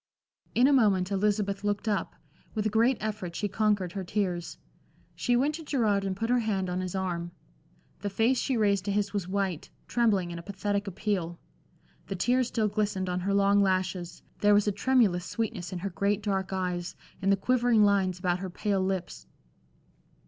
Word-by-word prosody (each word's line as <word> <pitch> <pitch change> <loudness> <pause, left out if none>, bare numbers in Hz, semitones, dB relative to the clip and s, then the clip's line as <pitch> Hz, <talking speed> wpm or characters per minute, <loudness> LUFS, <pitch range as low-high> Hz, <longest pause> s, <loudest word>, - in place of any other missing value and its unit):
In 245 - +5
a 285 - +5
moment 200 -7 +3
Elizabeth 200 0 0
looked 205 +1 -1
up; 205 -2 -1 0.4
with 215 -1 -1
a 215 - +1
great 230 +3 +3
effort 205 -5 -4
she 210 - -1
conquered 205 -3 +1
her 195 +1 -4
tears. 180 -3 -2 0.6
She 245 - 0
went 280 +5 +2
to 325 +1 -6
Gerard 220 -9 +1
and 190 -1 -2
put 225 +4 -2
her 250 - +4
hand 195 -5 -1
on 180 - -1
his 185 0 -4
arm. 175 -2 -2 0.7
The 205 - -3
face 230 +6 +2
she 265 -3 0
raised 200 -3 +2
to 200 - 0
his 200 0 0
was 200 -4 -2
white, 190 -4 -2 0.2
trembling 205 -7 +1
in 170 - -5
a - - -7
pathetic 200 +2 -2
appeal. 190 -3 -2 0.7
The 195 - -3
tears 245 +6 +2
still 220 -3 0
glistened 205 -3 -1
on 180 0 -1
her 195 +2 -1
long 200 0 +4
lashes, 185 -2 -1 0.2
there 205 0 +5
was 205 0 +3
a - - +3
tremulous 205 -5 +2
sweetness 220 -7 -3
in 185 - -4
her 195 +3 -4
great 200 +3 0
dark 195 -2 -1
eyes, 180 -2 -2 0.3
in 195 - +1
the 200 - +4
quivering 240 0 +3
lines 195 -3 +2
about 180 -1 0
her 190 0 -4
pale 195 +2 -1
lips. 185 - -3
200 Hz, 190 wpm, -28 LUFS, 185-215 Hz, 0.7 s, In